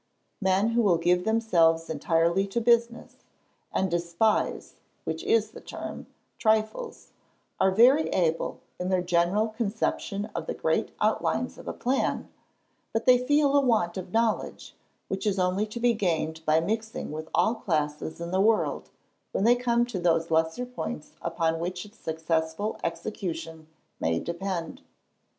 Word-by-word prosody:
Men 190 Hz, +3 st, +2 dB
who 235 Hz, +1 st, +2 dB
will 190 Hz, -6 st, +4 dB
give 180 Hz, +2 st, +2 dB
themselves 170 Hz, -8 st, +3 dB
entirely 165 Hz, +5 st, +1 dB
to 200 Hz, +4 st, -1 dB
business, 235 Hz, 0 st, +1 dB, 0.5 s
and 190 Hz, -2 st, 0 dB
despise 175 Hz, +5 st, 0 dB, 0.3 s
(which 335 Hz, -, -4 dB
is 440 Hz, +3 st, +2 dB
the -, -, -11 dB
term) -, -, -7 dB, 0.3 s
trifles, 220 Hz, -, 0 dB, 0.5 s
are 190 Hz, -, +4 dB
very 250 Hz, +10 st, +5 dB
able, 165 Hz, -3 st, 0 dB, 0.2 s
in 180 Hz, +1 st, -2 dB
their 185 Hz, -1 st, +1 dB
general 180 Hz, +5 st, +2 dB
conception 215 Hz, -2 st, -2 dB
of -, -, -4 dB
the 485 Hz, -, -3 dB
great -, -, 0 dB
outlines -, -, 0 dB
of -, -, -11 dB
a -, -, -1 dB
plan, 260 Hz, +2 st, -1 dB, 0.6 s
but 225 Hz, -, -1 dB
they 250 Hz, -1 st, +6 dB
feel 285 Hz, +2 st, +3 dB
a 285 Hz, -, +6 dB
want 220 Hz, -10 st, +1 dB
of 185 Hz, -1 st, -6 dB
knowledge, 225 Hz, -1 st, -1 dB, 0.3 s
which 195 Hz, +3 st, -3 dB
is 200 Hz, -1 st, +1 dB
only 185 Hz, +3 st, +1 dB
to 215 Hz, +3 st, -6 dB
be 240 Hz, 0 st, +3 dB
gained 160 Hz, -6 st, -1 dB
by 155 Hz, +1 st, +5 dB
mixing 220 Hz, +4 st, -3 dB
with 155 Hz, +1 st, -6 dB
all 220 Hz, -, +3 dB
classes 155 Hz, -8 st, -2 dB
in 170 Hz, 0 st, -5 dB
the 190 Hz, +1 st, +2 dB
world, 220 Hz, +1 st, +1 dB, 0.4 s
when -, -, 0 dB
they 235 Hz, +3 st, +6 dB
come 240 Hz, -1 st, +1 dB
to 240 Hz, -6 st, -4 dB
those 165 Hz, -1 st, +1 dB
lesser 160 Hz, +9 st, +1 dB
points 250 Hz, -10 st, -6 dB
upon 165 Hz, -1 st, 0 dB
which 180 Hz, +2 st, -4 dB
its 210 Hz, +1 st, -17 dB
successful 160 Hz, +5 st, -2 dB
execution 165 Hz, -5 st, -4 dB, 0.3 s
may 80 Hz, 0 st, +1 dB
depend." 170 Hz, -1 st, -4 dB
190 Hz, 150 wpm, -27 LUFS, 165-225 Hz, 0.6 s, they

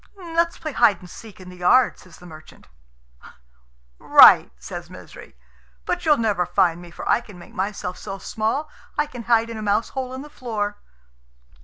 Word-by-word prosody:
"Let's 335 Hz, -2 st, -1 dB
play 310 Hz, -2 st, -5 dB
hide 210 Hz, -7 st, +3 dB
and 180 Hz, -, -14 dB
seek 215 Hz, +3 st, -13 dB
in 185 Hz, -1 st, -11 dB
the 180 Hz, -, -12 dB
yard," 235 Hz, +8 st, +3 dB
says 185 Hz, -, -16 dB
the 180 Hz, -, -16 dB
merchant. 155 Hz, -2 st, -14 dB, 1.3 s
"Right," -, -, +7 dB
says -, -, -9 dB
Misery; -, -, -13 dB, 0.5 s
"but -, -, -3 dB
you'll 300 Hz, -1 st, +5 dB
never 205 Hz, -6 st, 0 dB
find 175 Hz, -1 st, +1 dB
me, 175 Hz, -, -12 dB
for 170 Hz, -, -9 dB
I -, -, +3 dB
can 210 Hz, -6 st, -14 dB
make 175 Hz, -, -14 dB
myself 190 Hz, -2 st, -4 dB
so 195 Hz, -1 st, -7 dB
small 220 Hz, +9 st, -2 dB, 0.3 s
I 300 Hz, -, +2 dB
can 255 Hz, -5 st, -9 dB
hide 230 Hz, -1 st, +2 dB
in 225 Hz, -, -6 dB
a -, -, -6 dB
mouse 210 Hz, +1 st, 0 dB
hole 260 Hz, -2 st, -5 dB
in 265 Hz, -, -7 dB
the -, -, -11 dB
floor." 210 Hz, -7 st, -4 dB
215 Hz, 185 wpm, -22 LUFS, 180-255 Hz, 1.3 s, Right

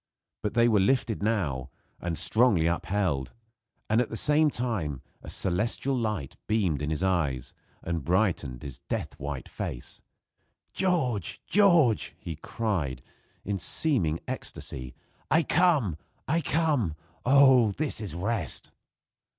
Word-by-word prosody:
But 105 Hz, -, -3 dB
they 120 Hz, 0 st, +5 dB
were 110 Hz, -3 st, +4 dB
lifted 115 Hz, +1 st, +1 dB
now, 85 Hz, -, -1 dB, 0.3 s
and 85 Hz, -2 st, -2 dB
strongly 110 Hz, -8 st, +4 dB
upheld; 85 Hz, -6 st, -1 dB, 0.5 s
and 110 Hz, +3 st, +3 dB
at 125 Hz, -, -2 dB
the 115 Hz, -, -4 dB
same 150 Hz, +3 st, +4 dB
time 100 Hz, -, -3 dB, 0.2 s
a -, -, -10 dB
celestial 110 Hz, +8 st, 0 dB
light 105 Hz, -, -3 dB
beamed 95 Hz, -10 st, +1 dB
in 75 Hz, -, -2 dB
his 80 Hz, +3 st, -2 dB
eyes, 80 Hz, -10 st, 0 dB, 0.3 s
and 85 Hz, -3 st, -3 dB
brightened 85 Hz, -, 0 dB
his 70 Hz, -3 st, -8 dB
death -, -, -3 dB
white 70 Hz, -1 st, -5 dB
face. -, -, -6 dB, 0.7 s
"George! 160 Hz, -, 0 dB
George!" 170 Hz, -, +4 dB
he 80 Hz, -, -6 dB
cried, 80 Hz, -, -3 dB, 0.4 s
in 100 Hz, 0 st, -2 dB
seeming 90 Hz, -, +1 dB
ecstasy, 65 Hz, -1 st, -5 dB, 0.3 s
"I 160 Hz, +3 st, +4 dB
come! 145 Hz, -, +2 dB, 0.3 s
I 165 Hz, +1 st, +1 dB
come! 145 Hz, -, +1 dB, 0.3 s
Oh! 130 Hz, -3 st, +6 dB
this 140 Hz, +2 st, -1 dB
is 100 Hz, -6 st, -3 dB
rest!" 100 Hz, -, -1 dB
105 Hz, 125 wpm, -27 LUFS, 80-125 Hz, 0.7 s, Oh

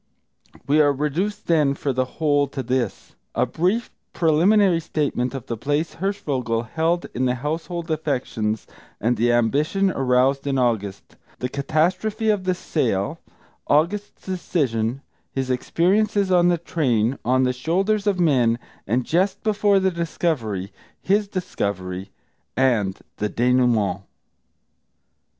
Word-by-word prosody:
We 150 Hz, +2 st, +4 dB
are 145 Hz, -1 st, +4 dB
reduced, 150 Hz, +9 st, -2 dB
then, 150 Hz, -4 st, +3 dB
for 140 Hz, -1 st, -2 dB
the 130 Hz, +1 st, +1 dB
whole, 145 Hz, -2 st, +2 dB
to 135 Hz, -1 st, -5 dB
this: 125 Hz, -3 st, -2 dB, 0.2 s
a -, -, +3 dB
brief 195 Hz, +8 st, 0 dB, 0.2 s
preliminary 175 Hz, +3 st, +4 dB
statement 145 Hz, -5 st, -1 dB
of 130 Hz, -, -6 dB
the 115 Hz, -, -3 dB
place 145 Hz, +7 st, -1 dB
Hirschvogel 145 Hz, -, -1 dB
held 165 Hz, +8 st, 0 dB
in 130 Hz, -, 0 dB
the 125 Hz, 0 st, +1 dB
household 165 Hz, +5 st, -4 dB
affections, 125 Hz, -8 st, -2 dB, 0.3 s
and 120 Hz, +3 st, +1 dB
the 120 Hz, +2 st, +2 dB
ambition 150 Hz, -, +2 dB
aroused 135 Hz, +1 st, +2 dB
in 135 Hz, -1 st, +1 dB
August; 110 Hz, -6 st, -1 dB, 0.2 s
the 125 Hz, -, -3 dB
catastrophe 180 Hz, -, 0 dB
of 200 Hz, -3 st, -1 dB
the 185 Hz, -1 st, +1 dB
sale; 140 Hz, -, -1 dB, 0.5 s
August's 180 Hz, +8 st, 0 dB
decision; 135 Hz, -10 st, -1 dB, 0.3 s
his 130 Hz, -1 st, -2 dB
experiences 195 Hz, +9 st, +1 dB
on 175 Hz, -1 st, +5 dB
the 175 Hz, -1 st, +3 dB
train, 135 Hz, -8 st, 0 dB
on 130 Hz, +3 st, +2 dB
the 125 Hz, 0 st, +1 dB
shoulders 195 Hz, +10 st, 0 dB
of 195 Hz, -3 st, +1 dB
men, 125 Hz, -9 st, +3 dB, 0.3 s
and 120 Hz, +4 st, +1 dB
just 185 Hz, +4 st, 0 dB
before 205 Hz, -2 st, +3 dB
the 190 Hz, 0 st, +1 dB
discovery; 140 Hz, -, -2 dB, 0.3 s
his 205 Hz, +2 st, +1 dB
discovery, 100 Hz, -, -3 dB, 0.5 s
and 115 Hz, -8 st, +1 dB, 0.2 s
the 105 Hz, -, -1 dB
dénouement. 120 Hz, -5 st, +2 dB
145 Hz, 130 wpm, -23 LUFS, 125-180 Hz, 0.5 s, on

